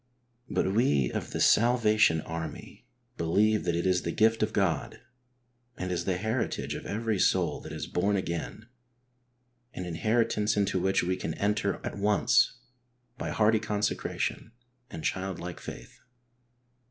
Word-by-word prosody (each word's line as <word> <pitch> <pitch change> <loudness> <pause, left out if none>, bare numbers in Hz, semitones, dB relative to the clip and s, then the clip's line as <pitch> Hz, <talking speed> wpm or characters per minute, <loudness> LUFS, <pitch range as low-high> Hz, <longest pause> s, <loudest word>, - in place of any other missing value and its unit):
But 95 - 0
we 70 - +2
of - - -3
iTe - - -4
Salvation 110 -7 +4
Army 80 -1 -7 0.3
believe 105 +6 +2
that 85 -1 +1
it 85 - -1
is 90 -1 +2
the - - -4
gift 110 +2 +3
of 110 0 +1
God, 95 -8 -1 0.8
and 90 0 -3
is 85 -1 -2
the 95 -2 0
heritage 110 +6 -2
of - - -6
every 110 -1 -1
soul - - +2
that - - -9
is - - -4
born 100 +3 0
again, 90 +3 -4 1.1
an 90 - -4
inheritance 110 +4 +1
into 100 -2 +1
which 95 +1 +1
we 90 +1 0
can 80 -3 -4
enter 105 0 0
at - - -5
once 105 +5 +3 0.7
by - - -3
hearty 110 0 +3
consecration 105 +2 -2 0.4
and 80 - -7
childlike 95 -2 -3
faith. - - -10
100 Hz, 140 wpm, -28 LUFS, 90-110 Hz, 1.1 s, Salvation